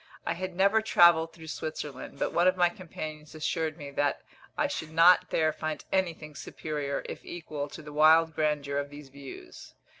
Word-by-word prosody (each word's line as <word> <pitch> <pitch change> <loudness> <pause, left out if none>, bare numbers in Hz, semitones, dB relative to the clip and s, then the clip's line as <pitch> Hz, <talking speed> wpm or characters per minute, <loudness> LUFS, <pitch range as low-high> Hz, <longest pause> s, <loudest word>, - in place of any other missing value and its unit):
I - - 0
had 185 +1 -5
never 200 +4 +4
travelled 170 -6 +5
through 160 -1 -11
Switzerland, 150 -4 -6
but - - -1
one 175 +1 +4
of 185 0 +3
my 175 -1 +4
companions 155 -4 -8
assured 160 0 -2
me 145 -3 -8
that 145 0 0 0.3
I - - +2
should 160 - -3
not 165 +3 +6
there 155 -1 +2
find 155 -1 -4
anything 170 -5 -1
superior, 145 0 -4
if - - -7
equal, 150 -4 -6
to 155 - -10
the 150 0 -10
wild 160 +2 +5
grandeur 150 -2 0
of 145 0 -4
these 145 -1 -11
views. 140 0 -11
155 Hz, 180 wpm, -29 LUFS, 145-170 Hz, 0.3 s, not